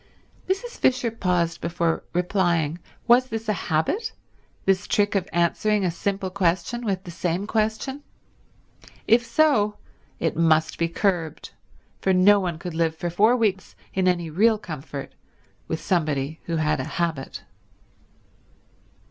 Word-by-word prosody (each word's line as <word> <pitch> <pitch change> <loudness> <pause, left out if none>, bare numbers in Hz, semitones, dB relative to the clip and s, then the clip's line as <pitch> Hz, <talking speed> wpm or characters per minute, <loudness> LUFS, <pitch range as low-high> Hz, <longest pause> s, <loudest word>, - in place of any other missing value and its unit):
Mrs. 470 +6 -2
Fisher 250 -2 +2
paused 175 -5 0
before 170 -1 -1
replying. 175 -3 +1 0.3
Was 250 +2 +5
this 225 -2 -5
a 215 - +2 0.2
habit, 380 - 0 0.5
this 195 +1 +2
trick 205 -1 +2
of 195 -3 -1
answering 190 +4 +1
a 175 - +1
simple 195 +2 -2
question 185 +5 0
with 195 -4 -1
the 175 - -8
same 175 +2 -2
question? 220 +6 -1 1.1
If 235 +2 +5
so 235 -5 +2 0.4
it 165 - 0
must 160 -1 +2
be 170 - +2
curbed, 170 -3 -1 0.5
for 190 - +2
no 200 +3 +6
one 175 -4 -2
could 175 0 -6
live 160 -1 0
for 175 +1 -3
four 215 +8 +4
weeks 200 -5 -1 0.2
in 190 -1 +1
any 175 -3 0
real 215 +7 +4
comfort 150 -7 -7 0.5
with 160 - -2
somebody 155 -3 -1
who 170 - -2
had 155 -2 +1
a - - -1
habit. 165 -6 -2
185 Hz, 140 wpm, -24 LUFS, 165-215 Hz, 1.1 s, no